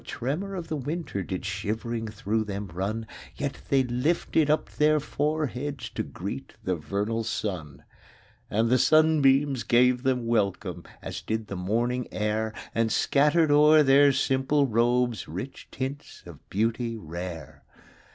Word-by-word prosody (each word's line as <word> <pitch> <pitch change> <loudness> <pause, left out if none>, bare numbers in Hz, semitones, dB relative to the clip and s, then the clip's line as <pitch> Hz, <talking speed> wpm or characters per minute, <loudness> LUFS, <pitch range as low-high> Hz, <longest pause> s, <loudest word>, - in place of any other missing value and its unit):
5 - - -21
Though - - -13
a - - -6
tremor 165 +11 -3
of 175 -3 -5
the 160 - -2
winter 145 - -3
Did 95 0 -5
shivering 110 +3 -3
through 110 0 -1
them 100 -1 -5
run; 105 +5 -2 0.3
Yet 140 -2 -4
they 135 -1 +4
lifted 145 +4 +1
up 155 - +2
their 150 0 +2
foreheads 145 -2 -2
To - - -3
greet 105 +9 -6
the 95 - 0
vernal 100 +8 -2
sun. 80 -10 -4 0.7
And 115 +3 +1
the 130 - +4
sunbeams 145 -3 +4
gave 125 +1 +3
them 130 -2 0
welcome. 105 -5 -1 0.2
As - - -5
did 110 -1 -3
the 100 - -4
morning 120 +7 -1
air 110 +1 -1 0.2
And 115 -1 +1
scattered 150 +2 +3
o'er 150 +1 +7
their 140 +1 +6
simple 135 +2 +2
robes 120 0 +1
Rich 135 +1 -7
tints 135 +2 -6
of - - -13
beauty 115 +3 -1
rare. 85 -4 -7
120 Hz, 150 wpm, -27 LUFS, 105-145 Hz, 0.7 s, o'er